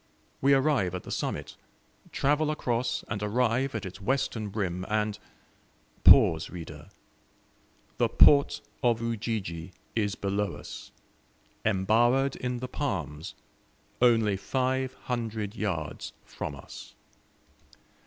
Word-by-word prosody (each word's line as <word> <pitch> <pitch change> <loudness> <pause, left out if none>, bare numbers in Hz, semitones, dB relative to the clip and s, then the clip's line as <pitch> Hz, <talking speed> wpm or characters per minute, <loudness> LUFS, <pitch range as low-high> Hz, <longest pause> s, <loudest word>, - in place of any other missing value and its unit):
We 140 +1 +5
arrive 135 - +2
at 90 - -5
the - - -8
summit, - - -3 0.6
travel 150 +2 +1
across 120 -5 -1
and 100 0 -3
arrive 120 +4 +1
at 105 -2 -3
its 95 +2 -8
western 110 -3 -1
rim, 95 -3 -2
and 105 -1 0 0.8
pause, 80 0 +7
reader 80 -1 -9 1.1
the - - +3
port 140 -1 +5 0.2
of 120 -3 +2
Ujiji 105 -7 -3 0.2
is 105 -3 0
below 100 +1 -1
us, - - -9 0.7
embowered 120 +7 +3
in 125 -1 -3
the 130 - -3
palms, 85 - -4 0.7
only 115 -5 +4
five 130 +5 -1
hundred 115 -4 -3
yards 85 -9 -3
from - - -6
us! - - -11
110 Hz, 110 wpm, -28 LUFS, 95-125 Hz, 1.1 s, pause